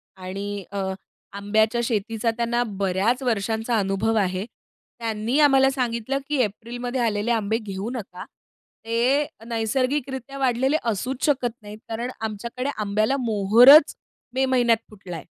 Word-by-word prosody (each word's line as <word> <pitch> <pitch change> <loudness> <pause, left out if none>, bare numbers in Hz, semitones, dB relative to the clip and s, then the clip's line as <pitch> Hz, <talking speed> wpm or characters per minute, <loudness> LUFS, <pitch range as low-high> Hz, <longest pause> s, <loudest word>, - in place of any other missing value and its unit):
आणि 195 +2 -5
अ, 200 - -5 0.6
आंब्याच्या 220 +4 +1
शेतीचा 225 0 -1
त्यांना 240 +1 +1 0.2
बऱ्याच 200 +6 +1
वर्षांचा 225 0 0
अनुभव 195 +3 0
आहे. 190 -2 0 0.5
त्यांनी 230 +4 -1
आम्हाला 270 -2 +5
सांगितलं 250 0 -2
की 300 - 0
एप्रिलमध्ये 240 +4 -4
आलेले 220 0 0
आंबे 220 -1 +1
घेऊ 200 -1 -5
नका. 190 -6 -7 0.6
ते 245 +6 +2 0.2
नैसर्गिकरित्या 260 +4 -2
वाढलेले 265 +2 +1
असूच 250 +6 -3
शकत 260 -5 +1
नाहीत. 210 0 -10
कारण 235 +2 -3
आमच्याकडे 235 +4 -4
आंब्याला 215 +5 0
मोहोरच 235 +6 +6 0.4
मे 265 +1 +2
महिन्यात 245 -3 +3
फुटलाय. 180 -6 -9
230 Hz, 120 wpm, -23 LUFS, 205-250 Hz, 0.6 s, मोहोरच